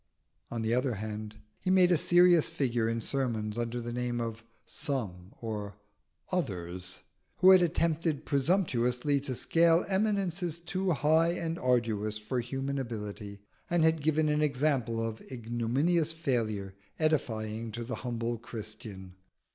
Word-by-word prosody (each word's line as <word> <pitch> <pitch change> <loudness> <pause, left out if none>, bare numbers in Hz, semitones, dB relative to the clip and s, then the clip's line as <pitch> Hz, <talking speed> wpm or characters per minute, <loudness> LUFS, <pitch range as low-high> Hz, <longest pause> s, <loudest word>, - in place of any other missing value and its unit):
On 115 -1 -3
the 110 +1 +1
other 125 -1 +1
hand, 105 0 -6 0.2
he - - -2
made 185 -1 +5
a - - +6
serious 175 0 +5
figure 120 -4 0
in 115 0 -1
sermons 115 -5 -2
under 120 +1 -2
the 120 0 -5
name 120 0 -1
of 115 -1 -4 0.2
"Some" 100 -10 -4
or 105 -3 -5 0.6
"Others" 90 - -3 0.3
who 185 +1 +7
had 185 -1 +8
attempted 165 -3 0
presumptuously 140 -4 +1
to 135 -2 -4
scale 165 +5 +3
eminences 190 -4 0
too 185 +2 -2
high 160 +2 +3
and 165 -1 -3
arduous 110 -4 +1
for 110 +4 -3
human 135 +3 -3
ability, 105 -4 -6 0.3
and 175 -2 +3
had 160 -1 +3
given 155 +1 +2
an 150 0 +2
example 130 -6 +1
of 110 0 -6
ignominious 130 +8 0
failure 110 -11 -1 0.2
edifying 115 -8 -1
to 120 - -4
the 125 +3 -4
humble 120 -1 -2
Christian. 105 -4 -8
125 Hz, 140 wpm, -30 LUFS, 110-160 Hz, 0.6 s, had